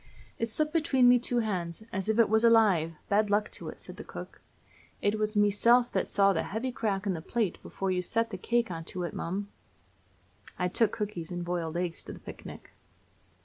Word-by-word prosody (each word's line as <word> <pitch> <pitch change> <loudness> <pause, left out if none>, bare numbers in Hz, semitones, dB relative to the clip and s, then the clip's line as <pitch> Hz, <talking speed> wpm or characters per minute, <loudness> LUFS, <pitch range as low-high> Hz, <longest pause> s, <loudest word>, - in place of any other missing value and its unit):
"It 230 - -1
slipped 305 +6 +1
between 270 -6 +3
me 245 0 +7
two 240 0 0
hands 185 -3 -3
as 190 +2 -2
if 220 - +2
it 230 - +5
was 220 +2 +2
alive, 205 -9 +4
bad 205 +1 +2
luck 210 +1 +1
to - - -6
it," - - -10
said - - -11
the - - -7
cook; - - -10 0.6
"and 205 - +1
it 215 - -3
was 215 0 0
meself 230 +4 +4
that - - 0
saw 195 -1 +3
the 160 - 0
heavy 230 +5 -3
crack 205 -4 -2
in 195 - +1
the 165 - -5
plate 215 0 -2
before 195 -1 -3
you 180 -1 0
set 230 +5 -1
the 190 - -4
cake 235 0 0
onto 165 +2 -3
it, 175 - -4
mum!" 195 +4 -4 1.1
I 180 0 0
took 225 +4 +3
cookies 200 -6 -4
and 175 0 -4
boiled 170 -2 -2
eggs 175 -1 -3
to - - -7
the - - -11
picnic. - - -10
205 Hz, 210 wpm, -29 LUFS, 180-230 Hz, 1.1 s, me